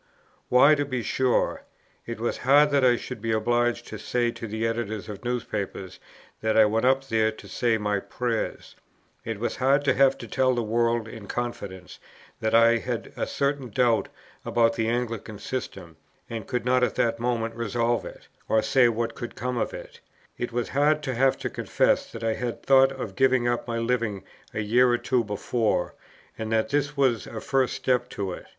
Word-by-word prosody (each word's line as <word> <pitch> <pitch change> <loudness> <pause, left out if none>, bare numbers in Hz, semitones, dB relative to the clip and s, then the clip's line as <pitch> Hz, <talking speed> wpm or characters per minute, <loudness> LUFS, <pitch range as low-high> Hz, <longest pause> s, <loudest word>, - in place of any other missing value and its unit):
Why, 135 +4 +7
to 145 -1 +1
be 130 -4 -3
sure, 130 +1 +1 0.5
it 115 -1 -5
was 120 - -2
hard 145 +3 +5
that 140 -2 +3
I 125 -1 +5
should 120 -1 -7
be 115 0 -1
obliged 120 +2 +1
to 110 - -7
say 120 +2 0
to 115 - -7
the 110 +2 -2
Editors 110 -3 -3
of 105 0 -8
newspapers 105 -6 -4 0.4
that 110 0 +1
I 110 - +8
went 110 +3 +1
up 135 +1 +2
there 110 -2 +2
to - - -13
say 120 -2 +1
my 105 -1 0
prayers; 115 +2 -3 0.5
it 115 -2 -4
was 120 - -2
hard 140 +2 +2
to - - +4
have 135 -1 +4
to - - -9
tell 130 -1 +2
the 120 - 0
world 115 +1 +1
in 110 -2 -10
confidence, 100 -7 -5 0.4
that 110 0 +1
I 115 0 +6
had - - -4
a - - -2
certain 140 -2 -1
doubt 120 -1 +2 0.3
about 115 -1 +2
the 115 -1 -1
Anglican 115 -3 -3
system, 130 +5 -6 0.3
and 115 -3 -6
could 125 -2 -2
not 125 0 +3
at - - +1
that 115 -1 +1
moment 115 -1 -1
resolve 115 +1 0
it, - - -11 0.2
or 110 -1 +3
say 120 +2 +4
what 115 0 -3
would 120 - -6
come 125 0 -3
of - - -1
it; - - -10 0.4
it 120 - -4
was 120 0 -2
hard 150 +3 +2
to 135 - -2
have 130 +2 +2
to - - -4
confess - - +1
that 115 - -8
I 115 0 +1
had 120 0 -4
thought 135 0 +5
of 125 -8 -6
giving 130 -2 +3
up 120 +1 -1
my 115 -1 -2
Living 115 -4 -1 0.3
a 110 - -3
year 120 +4 +4
or 120 - +3
two 125 -1 0
before, 105 -2 -1 0.5
and 110 0 -4
that 110 -1 +1
this 145 +1 -1
was 130 -5 +2
a 110 - -6
first 135 0 0
step 125 -1 0
to 95 -2 -4
it. - - -8
120 Hz, 195 wpm, -26 LUFS, 110-125 Hz, 0.5 s, I